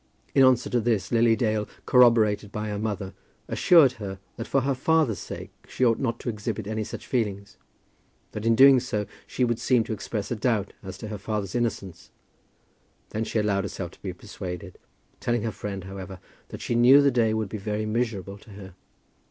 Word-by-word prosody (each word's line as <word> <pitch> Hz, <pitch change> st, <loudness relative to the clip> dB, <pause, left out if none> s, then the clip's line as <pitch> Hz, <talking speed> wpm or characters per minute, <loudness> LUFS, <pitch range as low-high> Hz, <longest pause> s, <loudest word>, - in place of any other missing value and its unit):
In 135 Hz, -, +5 dB
answer 130 Hz, -2 st, +4 dB
to 120 Hz, -, +2 dB
this, 110 Hz, -3 st, 0 dB
Lily 115 Hz, -1 st, +4 dB
Dale, 110 Hz, -3 st, 0 dB, 0.2 s
corroborated 110 Hz, -5 st, +4 dB
by 105 Hz, 0 st, -4 dB
her 105 Hz, -1 st, -3 dB
mother, 105 Hz, -3 st, -3 dB, 0.3 s
assured 160 Hz, -7 st, +5 dB
her 95 Hz, -1 st, -5 dB, 0.2 s
that 115 Hz, -, -6 dB
for 135 Hz, -, +2 dB
her 135 Hz, +2 st, 0 dB
father's 145 Hz, -3 st, +1 dB
sake -, -, -8 dB, 0.2 s
she 130 Hz, -, 0 dB
ought 115 Hz, -2 st, +3 dB
not 120 Hz, -3 st, -2 dB
to -, -, -9 dB
exhibit 105 Hz, -1 st, -4 dB
any 110 Hz, +1 st, -2 dB
such -, -, -8 dB
feeling; 105 Hz, -5 st, -1 dB, 0.9 s
that 105 Hz, -, -6 dB
in 115 Hz, 0 st, +3 dB
doing 135 Hz, +1 st, +8 dB
so, 105 Hz, -4 st, -2 dB, 0.2 s
she 125 Hz, -, -1 dB
would 120 Hz, -1 st, -1 dB
seem 125 Hz, -1 st, +3 dB
to 110 Hz, -, -4 dB
express 105 Hz, 0 st, -4 dB
a -, -, 0 dB
doubt 110 Hz, -3 st, 0 dB
as 95 Hz, -1 st, -8 dB
to 110 Hz, -, -7 dB
her 105 Hz, -2 st, -5 dB
father's 100 Hz, -3 st, -3 dB
innocence. 105 Hz, -7 st, -3 dB, 1.0 s
Then 110 Hz, +1 st, -3 dB
she -, -, -3 dB
allowed 105 Hz, -2 st, +1 dB
herself 95 Hz, -3 st, -5 dB
to -, -, -20 dB
be 95 Hz, -, -4 dB
persuaded, 90 Hz, -1 st, -8 dB, 0.4 s
telling 120 Hz, -2 st, -1 dB
her 115 Hz, -, -1 dB
friend, 100 Hz, -2 st, -6 dB
however, 95 Hz, 0 st, -8 dB, 0.3 s
that -, -, -9 dB
she -, -, -2 dB
knew 125 Hz, +4 st, +7 dB
the 140 Hz, -, +4 dB
day 115 Hz, -3 st, +2 dB
would 110 Hz, -2 st, -2 dB
be 110 Hz, -, -5 dB
very 105 Hz, +2 st, -2 dB
miserable 105 Hz, -4 st, -2 dB
to 110 Hz, -, -18 dB
her. 95 Hz, -2 st, -11 dB
110 Hz, 195 wpm, -26 LUFS, 100-120 Hz, 1.0 s, doing